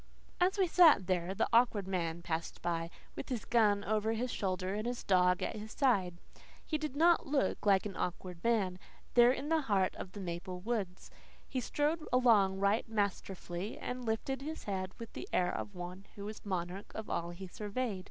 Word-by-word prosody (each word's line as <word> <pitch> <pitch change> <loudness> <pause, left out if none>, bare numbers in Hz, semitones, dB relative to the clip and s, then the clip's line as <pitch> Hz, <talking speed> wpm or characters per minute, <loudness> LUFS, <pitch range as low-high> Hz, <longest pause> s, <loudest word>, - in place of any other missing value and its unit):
As 370 +3 +3
we 385 - +4
sat 325 - +6
there 180 0 -1
the 220 - +1
Awkward 230 -5 +4
Man 170 -3 -2
passed 165 -1 -4
by, 170 -1 -1 0.3
with - - -6
his 245 -4 -3
gun 210 -4 +3
over 215 +1 +1
his 245 +2 -2
shoulder 185 -1 -2
and 215 +3 -2
his 245 0 -3
dog 180 0 +3
at - - -2
his 215 +1 -7
side. 190 -10 +2 0.5
He 310 - -1
did 305 -3 -4
not 335 +2 +4
look 275 -6 0
like 195 -1 +5
an 200 -2 -5
awkward 180 -1 -4
man, 200 -6 +1 0.3
there 240 0 +7
in 275 +3 -3
the 325 -1 +3
heart 200 -8 +1
of 185 - -7
the 205 - -7
maple 180 0 -5
woods. 195 -3 -3 0.4
He 260 - -2
strode 300 +6 0
along 220 -7 +4
right 200 +4 +1
masterfully 200 -2 -3
and 250 0 -5
lifted 240 +4 -2
his 315 +3 -5
head 185 -2 -3
with 230 -1 -9
the - - -7
air 180 -1 +2
of 205 - -5
one 180 +2 -7
who 200 - -7
was 215 +1 -7
monarch 185 0 -4
of 220 - -5
all 170 0 -2
he 175 +2 -7
surveyed. 210 +2 -3
205 Hz, 190 wpm, -33 LUFS, 185-245 Hz, 0.5 s, there